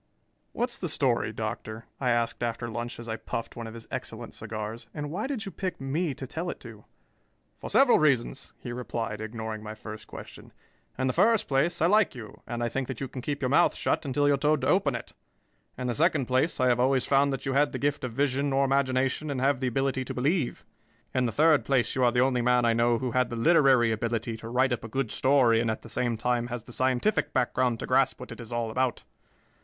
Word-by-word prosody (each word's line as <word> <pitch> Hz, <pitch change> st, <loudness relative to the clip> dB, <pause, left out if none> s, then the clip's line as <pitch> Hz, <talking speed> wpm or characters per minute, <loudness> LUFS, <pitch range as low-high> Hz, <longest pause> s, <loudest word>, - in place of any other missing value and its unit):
"What's -, -, -1 dB
the -, -, -2 dB
story, -, -, +1 dB
Doctor?" 110 Hz, +1 st, -5 dB
I 125 Hz, -, 0 dB
asked 120 Hz, 0 st, 0 dB
after 120 Hz, 0 st, -2 dB
lunch 120 Hz, +1 st, -5 dB
as 120 Hz, -, -8 dB
I 110 Hz, 0 st, -3 dB
puffed 115 Hz, -, -5 dB
one 115 Hz, -1 st, -6 dB
of 110 Hz, -, -9 dB
his 115 Hz, -, -9 dB
excellent 120 Hz, -3 st, -6 dB
cigars. 110 Hz, +2 st, -6 dB
"And 150 Hz, -1 st, -4 dB
why 210 Hz, +9 st, -2 dB
did 255 Hz, -6 st, -3 dB
you 195 Hz, -, -6 dB
pick 185 Hz, -1 st, -4 dB
me 140 Hz, +3 st, -1 dB
to 135 Hz, -, -6 dB
tell 165 Hz, +7 st, -4 dB
it -, -, -6 dB
to?" 110 Hz, -4 st, -12 dB, 0.7 s
"For -, -, -6 dB
several 270 Hz, -3 st, +5 dB
reasons," 135 Hz, -4 st, +1 dB
he 120 Hz, -, -7 dB
replied, 115 Hz, -3 st, -4 dB
ignoring 110 Hz, 0 st, -5 dB
my 110 Hz, 0 st, -7 dB
first 110 Hz, 0 st, -9 dB
question. -, -, -11 dB, 0.4 s
"In 130 Hz, -, 0 dB
the 130 Hz, -, +1 dB
first 225 Hz, -, +3 dB
place, 145 Hz, +5 st, +1 dB
I -, -, +5 dB
like 200 Hz, -4 st, +3 dB
you 110 Hz, -4 st, -10 dB
and 120 Hz, 0 st, -3 dB
I -, -, +1 dB
think 130 Hz, +2 st, -3 dB
that 130 Hz, -, -5 dB
you 135 Hz, -, -3 dB
can 130 Hz, 0 st, -7 dB
keep 145 Hz, +2 st, -3 dB
your 130 Hz, -, +1 dB
mouth 160 Hz, +6 st, +4 dB
shut -, -, 0 dB
until 145 Hz, 0 st, +1 dB
you 145 Hz, -, +5 dB
are -, -, +2 dB
told 150 Hz, +1 st, +2 dB
to -, -, 0 dB
open 150 Hz, -9 st, +2 dB
it. 120 Hz, -, -7 dB, 0.6 s
In 125 Hz, -, -4 dB
the 125 Hz, -, 0 dB
second 155 Hz, -1 st, +2 dB
place, 130 Hz, +6 st, +1 dB
I 130 Hz, -, +3 dB
have 125 Hz, -1 st, +3 dB
always 130 Hz, 0 st, +2 dB
found 140 Hz, 0 st, +3 dB
that 135 Hz, -, -4 dB
you 135 Hz, -, -1 dB
had 145 Hz, +1 st, +3 dB
the -, -, -3 dB
gift 145 Hz, 0 st, -1 dB
of 125 Hz, -, -3 dB
vision 140 Hz, +1 st, +1 dB
or 135 Hz, +1 st, +3 dB
imagination 135 Hz, +2 st, +1 dB
and 140 Hz, -2 st, -2 dB
have 135 Hz, 0 st, +2 dB
the 130 Hz, -, -1 dB
ability 135 Hz, +1 st, 0 dB
to -, -, -5 dB
believe. 140 Hz, +2 st, 0 dB, 0.5 s
In 130 Hz, -1 st, +2 dB
the 115 Hz, -, 0 dB
third 155 Hz, +5 st, +4 dB
place, 135 Hz, -3 st, +1 dB
you 130 Hz, -, +1 dB
are 120 Hz, -, +5 dB
the 125 Hz, 0 st, +2 dB
only 130 Hz, -1 st, +2 dB
man 125 Hz, 0 st, +3 dB
I 115 Hz, -, +4 dB
know 115 Hz, +1 st, +3 dB
who 125 Hz, +1 st, -2 dB
had 125 Hz, 0 st, +1 dB
the 120 Hz, -, -4 dB
literary 130 Hz, -3 st, +4 dB
ability 115 Hz, +1 st, -2 dB
to 115 Hz, +1 st, -8 dB
write 130 Hz, +1 st, +2 dB
up 120 Hz, -, -4 dB
a -, -, -5 dB
good 125 Hz, 0 st, -2 dB
story 130 Hz, -4 st, +4 dB
and 115 Hz, -, 0 dB
at 110 Hz, -, -3 dB
the -, -, -11 dB
same 120 Hz, -2 st, -1 dB
time 120 Hz, +1 st, 0 dB
has 120 Hz, -2 st, -5 dB
the 120 Hz, -, -11 dB
scientific 130 Hz, -, +1 dB
background 125 Hz, -2 st, +1 dB
to -, -, -2 dB
grasp -, -, +2 dB
what -, -, -9 dB
it -, -, -9 dB
is 115 Hz, -, -8 dB
all 120 Hz, -1 st, -2 dB
about. 130 Hz, +1 st, -1 dB
125 Hz, 245 wpm, -27 LUFS, 115-140 Hz, 0.7 s, several